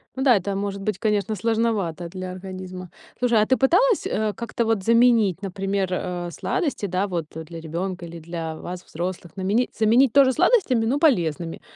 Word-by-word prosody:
Ну 265 - -2
да, 255 -4 +6
это 200 0 -1
может 200 0 -3
быть, 200 -1 -2
конечно, 210 0 0
сложновато 205 -6 -1
для 185 +1 -6
организма. 185 -1 -8 0.3
Слушай, 235 -3 +3
а - - +3
ты 260 +3 +2
пыталась, 375 - +3
э, 215 -1 -1
как-то 235 0 -3
вот 220 -4 0
заменить, 230 -5 +4
например, 195 0 -2
а, 180 -1 -3
сладости, 290 - -2
да, 185 +3 -1
вот, 175 -4 -3
а, 160 - -5
для 165 +1 -9
ребёнка 175 +3 -4
или 170 0 -9
для 165 -1 -5
вас, 180 +3 -7
взрослых, 175 +1 -6
наменить 205 +6 +1
заменить 230 +4 +4
тоже 270 -2 +6
сладостями, 320 - +3
но 260 +5 +1
полезными? 170 - +1
195 Hz, 180 wpm, -23 LUFS, 180-230 Hz, 0.3 s, да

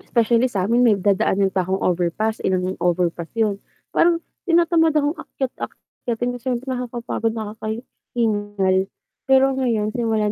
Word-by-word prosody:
specially 235 +1 +2
samin 220 +2 +1
may 215 -3 +5
dadaanan 195 0 +2
pa 185 -2 +1
akong 190 +1 -1
overpass, 180 +5 0
ilang 185 0 0
overpass 175 -1 0
yun, 210 -3 +1 0.3
parang 335 0 +3 0.3
tinatamad 330 -1 +4
akong 295 +2 +1
akyat 265 -2 -4
akyatin 245 0 -4
na 245 - -6
siyempre 250 +1 -2
nakakapagod, 240 -3 -2
nakakahingal, 215 -2 -2 0.5
pero 265 0 +6
ngayon 225 -5 0
simula 225 -3 +1
220 Hz, 130 wpm, -22 LUFS, 195-245 Hz, 0.5 s, pero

